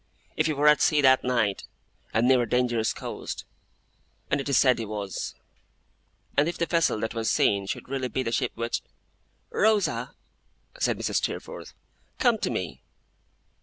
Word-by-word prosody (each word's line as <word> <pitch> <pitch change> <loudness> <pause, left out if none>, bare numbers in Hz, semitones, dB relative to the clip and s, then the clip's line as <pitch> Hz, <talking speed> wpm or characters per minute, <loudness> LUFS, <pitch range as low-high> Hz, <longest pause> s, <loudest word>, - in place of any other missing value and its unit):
If 155 - +2
he 155 - +1
were 145 +1 +2
at 150 -1 +6
sea 150 - +4
that 130 -1 +5
night, 120 -6 0 0.5
and 115 +2 +2
near 130 -1 +5
a 120 - -2
dangerous 120 -3 +1
coast, - - -6 0.9
as 140 - +2
it 140 - -4
is 140 - +3
said 130 -3 +4
he 115 - -3
was; 100 -3 -4 1.0
and 150 +3 +3
if 175 - -5
the 170 - +1
vessel 165 -9 +1
that 110 0 -2
was 115 -2 -1
seen 100 -1 +2
should - - -4
really 130 -1 -2
be 130 +2 -2
the 115 - -2
ship 125 +1 0
which 115 +1 -2 0.4
' - - -43
'Rosa!' 215 -1 +1 0.6
said - - +1
Mrs. - - -1
Steerforth, - - -4 0.4
'come 240 -3 +3
to - - -1
me! - - -4
125 Hz, 170 wpm, -26 LUFS, 115-150 Hz, 1.0 s, at